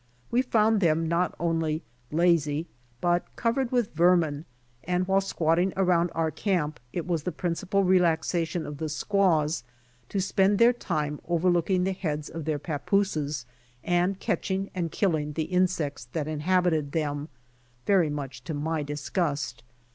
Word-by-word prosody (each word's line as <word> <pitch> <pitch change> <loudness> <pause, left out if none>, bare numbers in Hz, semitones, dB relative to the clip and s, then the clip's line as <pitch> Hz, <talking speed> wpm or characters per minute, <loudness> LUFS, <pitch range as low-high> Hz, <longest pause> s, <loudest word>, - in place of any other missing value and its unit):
We 245 - +4
found 220 -4 +2
them 165 -2 +2
not 170 +2 0
only 165 -2 0 0.3
lazy 160 -2 +2 0.4
but 175 0 +2
covered 235 +2 0
with 245 -4 0
vermin 165 -3 +3 0.4
and 180 0 0
while 195 0 +3
squatting 175 0 +1
around 180 -2 +3
our 160 -1 +1
camp 155 -4 -1
it 175 - -3
was 170 -3 0
the 180 - -3
principal 180 +4 -1
relaxation 175 -2 +2
of 145 -1 -7
the 160 -1 -2
squaws 160 - +1 0.5
to 200 - -1
spend 195 +1 +2
their 235 +3 +6
time 150 -10 -2
overlooking 175 +1 +2
the 190 - +1
heads 155 -5 -3
of 165 -2 -6
their 155 -2 0
papooses 150 -3 -1 0.4
and 180 +2 +1
catching 195 +1 -2
and 170 -3 -2
killing 155 -6 0
the 160 - -1
insects 175 -7 0
that 155 -2 -2
inhabited 155 -1 +1
them', 145 -1 -2 0.6
very 185 -6 +4
much 140 -4 -5
to 155 - -3
my 155 +2 -1
disgust. 145 - -2
170 Hz, 145 wpm, -27 LUFS, 155-185 Hz, 0.6 s, their